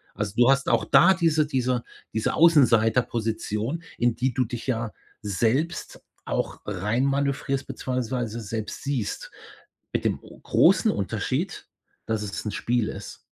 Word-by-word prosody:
Also, 105 -1 -3
du 120 +1 +6
hast 135 0 +2
auch 115 -2 +2
da 140 +11 +6
diese 160 -3 +2
diese 125 -3 0 0.3
diese 110 - 0
Außenseiterposition, 120 -2 +2
in 120 -1 +2
die 130 0 0
du 125 -1 +1
dich 120 +2 -6
ja 115 -3 -1 0.3
selbst 120 - -1 0.2
auch - - -2
reinmanövrierst 135 +7 0
beziehungsweise 125 -3 -3
selbst 110 0 -5
siehst, 135 -7 -3 0.6
mit - - -1
dem - - +1
großen - - +3
Unterschied, - - -2 0.4
dass 110 -1 -1
es 100 +1 -5
'n 105 - -2
Spiel 120 +1 0
ist. 100 - -8
120 Hz, 130 wpm, -25 LUFS, 110-135 Hz, 0.6 s, du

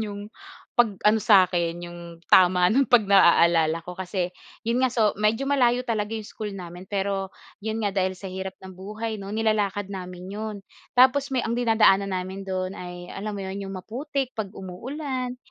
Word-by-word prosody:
iyong 205 -2 -5 0.5
pag 235 -3 +4 0.2
ano 215 - +4
sa 200 -3 +6
akin, 170 -1 -2
iyong 175 0 -9 0.3
tama 180 -1 +6
ng 270 +3 +3
pag 245 -4 +5
naaalala 170 -4 +5
ko 180 - -7
kasi 185 -1 -2 0.4
iyon 235 +3 +1
nga, 255 - +1
so, 220 -4 +2
medyo 220 +6 +1
malayo 250 -3 +3
talaga 220 -3 -2
iyong 220 -1 -4
school 210 -2 -6
namin, 180 -1 -8
pero 195 -1 -2 0.3
iyon 220 0 -2
nga 205 -2 0
dahil 185 0 +1
sa 190 +1 -8
hirap 190 0 -5
ng 190 - -9
buhay, 215 +4 -5
'no, 195 - -7
nilalakad 210 -3 0
namin 180 -1 -7
iyon. 215 0 -4 0.4
Tapos 265 +3 +5
may 260 - +2
ang 225 - -1
dinadaanan 220 -5 +4
namin 190 +2 -5
doon 185 0 -2
ay 180 -1 -8
alam 210 +2 -5
mo - - -5
iyon, 190 +1 -5
iyong 195 -1 -6
maputik 260 +7 -4
kapag 205 -3 -4
pag - - -16
umuulan, 255 - -5
200 Hz, 185 wpm, -25 LUFS, 185-225 Hz, 0.5 s, sa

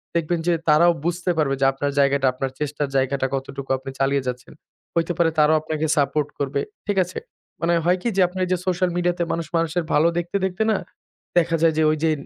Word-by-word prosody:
দেখবেন 170 +1 0
যে 175 - +4 0.2
তারাও 170 +3 +6
বুঝতে 175 +1 0
পারবে 135 -3 +1
যে - - +4
আপনার 140 +1 -2
জায়গাটা, 140 -1 +3
আপনার 130 0 -3
চেষ্টার 145 -1 -2
জায়গাটা 135 0 +1
কতটুকু 135 0 -6
আপনি 135 +1 -8
চালিয়ে 135 -1 +1
যাচ্ছেন। 125 +2 -5 0.4
হইতে 170 +1 +1
পারে 170 -1 +3
তারাও 150 +1 +5
আপনাকে 155 0 -2
সাপোর্ট 145 +1 +1
করবে। 140 0 -1 0.3
ঠিক 205 -1 -1
আছে? 180 - -7 0.4
মানে 170 +1 +2
হয় 180 +1 +3
কি 235 - 0
যে - - +5
আপনার 185 +1 -6
ওইযে 185 0 0
সোশ্যাল 180 0 +1
মিডিয়াতে 175 0 0
মানুষ 165 -2 -2
মানুষের 165 +1 0
ভালো 155 +3 +4
দেখতে, 175 +3 -3
দেখতে 190 +3 -1
না 205 - +2 0.6
দেখা 165 -1 +3
যায় 165 -1 +4
যে 160 - +3
ঐযে 155 +1 +1
160 Hz, 200 wpm, -22 LUFS, 140-175 Hz, 0.6 s, তারাও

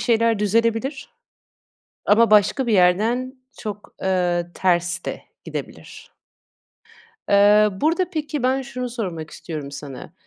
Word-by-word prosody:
şeyler 230 -2 +2
düzelebilir 230 +6 0 1.0
ama 225 +1 +5
başka 210 +5 +4
bir 235 - +1
yerden 220 +8 +2 0.2
çok, 205 -1 -7
eee, 180 -2 +1
ters 180 0 0
de - - -5 0.2
gidebilir. - - -8 1.1
Iıı, 205 0 +4
burada 345 +4 +1
peki, 300 -5 -3
ben, 260 +1 +1
şunu 250 -1 -5
sormak 180 -10 -5
istiyorum 150 -4 -7
sana; 140 -3 -9
210 Hz, 110 wpm, -22 LUFS, 180-250 Hz, 1.1 s, ama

